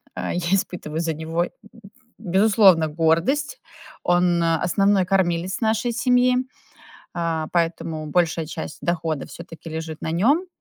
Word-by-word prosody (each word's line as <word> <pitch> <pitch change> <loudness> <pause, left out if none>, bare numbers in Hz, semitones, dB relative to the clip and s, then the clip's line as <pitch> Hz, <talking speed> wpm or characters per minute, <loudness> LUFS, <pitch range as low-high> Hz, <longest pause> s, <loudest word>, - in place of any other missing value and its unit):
А, - - -3
я 175 - -1
испытываю 175 -5 -2
за 165 -1 -1
него, 165 +3 -2 0.7
безусловно, 195 -3 +4
гордость. 170 - 0 0.4
Он- 175 -1 +2
основной 180 +4 +2
кормилец 185 0 0
нашей 220 +2 +1
семьи, 250 +1 +3 0.8
а, 165 -2 -1
поэтому 165 -2 -1
большая 165 0 0
часть 160 -1 -7
дохода 165 -4 -2
всё-таки 165 -1 -11
лежит 160 0 -6
на - - -2
нём. 275 - +2
170 Hz, 120 wpm, -22 LUFS, 160-195 Hz, 0.8 s, безусловно